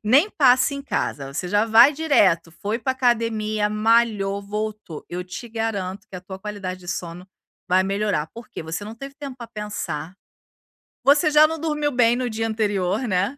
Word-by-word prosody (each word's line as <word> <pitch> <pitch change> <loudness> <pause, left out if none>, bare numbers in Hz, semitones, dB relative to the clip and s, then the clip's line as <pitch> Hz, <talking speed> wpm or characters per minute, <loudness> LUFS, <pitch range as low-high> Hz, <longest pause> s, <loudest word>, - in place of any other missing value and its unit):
Nem 275 - +5
passe 260 -1 +4
em 280 - -6
casa, 140 - -3
você 180 +5 -3
já 205 +3 +2
vai 230 +6 +7
direto. 205 - +3
Foi 210 +6 -3
pra 260 +3 -1
academia, 225 -4 0
malhou, 215 -2 +2
voltou. 210 -5 -5
Eu 180 +1 -5
te 210 +6 -8
garanto 210 -4 -3
que - - -14
a - - -8
tua 190 +1 -9
qualidade 190 -2 -6
de 175 - -13
sono 175 +1 -5 0.4
vai 185 +1 +4
melhorar. 200 -5 -1
Por 235 +1 -10
quê? - - -7
Você 160 +5 -5
não 215 +2 -8
teve 275 +4 -9
tempo 280 -3 -8
pra 240 -2 -8
pensar. 205 -7 -5 0.9
Você 300 +3 +4
já 300 +1 +7
não 320 +1 -4
dormiu 300 -2 -1
bem 240 -2 +3
no 250 0 -2
dia 225 0 -2
anterior, 210 +1 -1
né. 195 +7 0
215 Hz, 185 wpm, -23 LUFS, 190-250 Hz, 0.9 s, vai